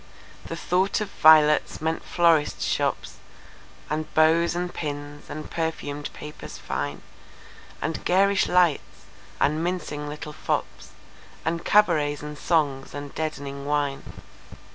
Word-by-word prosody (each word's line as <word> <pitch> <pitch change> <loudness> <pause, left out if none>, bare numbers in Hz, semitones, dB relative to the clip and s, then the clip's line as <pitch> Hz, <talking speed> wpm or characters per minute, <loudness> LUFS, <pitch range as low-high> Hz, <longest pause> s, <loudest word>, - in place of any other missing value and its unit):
The 165 - -5
thought 180 +4 +1
of 210 -2 -4
violets 155 -1 +5
meant 160 +1 -2
florists' 165 -4 +2
shops, - - -1 0.7
And 155 +1 -3
bows 165 +2 +4
and 175 0 -3
pins, 145 -1 -6
and 155 0 -6
perfumed 150 -3 -3
papers 150 0 -9
fine; 70 0 -4 0.8
And 160 - -3
garish 195 +2 +3
lights, 180 -4 +1 0.3
and 155 +3 +1
mincing 160 -5 -3
little 150 +1 -7
fopsAnd 165 +2 -5
cabarets 155 -8 +3
and 150 0 -6
songs, 145 -4 0
and 145 -1 -7
deadening 140 -3 -4
wine. 145 -2 0
155 Hz, 115 wpm, -25 LUFS, 145-170 Hz, 0.8 s, violets